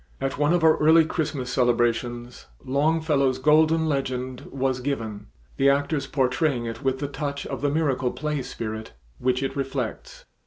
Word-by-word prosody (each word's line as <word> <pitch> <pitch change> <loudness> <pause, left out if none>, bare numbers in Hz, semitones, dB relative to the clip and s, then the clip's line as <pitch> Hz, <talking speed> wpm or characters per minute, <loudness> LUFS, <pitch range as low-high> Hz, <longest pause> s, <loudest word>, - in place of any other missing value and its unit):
At 135 +1 -3
one 145 +1 +3
of 175 -1 +2
our 160 -1 +6
early 160 +1 +5
Christmas 145 -6 -3
celebrations 120 - 0 0.2
Longfellow's 140 -1 +1
"Golden 155 +3 +4
Legend" 130 -3 -3
was 130 -1 -1
given, 115 -6 -4 0.3
the 140 - +4
actors 140 0 0
portraying 130 -1 0
it 115 -1 -5
with 135 -1 +1
the 145 - -3
touch 140 0 -4
of - - -5
the 145 - +1
miracle 140 -4 0
play 150 -2 -3
spirit 110 - -6 0.3
which 130 +1 0
it 135 +1 -3
reflects. 135 -4 -4
135 Hz, 155 wpm, -25 LUFS, 125-150 Hz, 0.3 s, our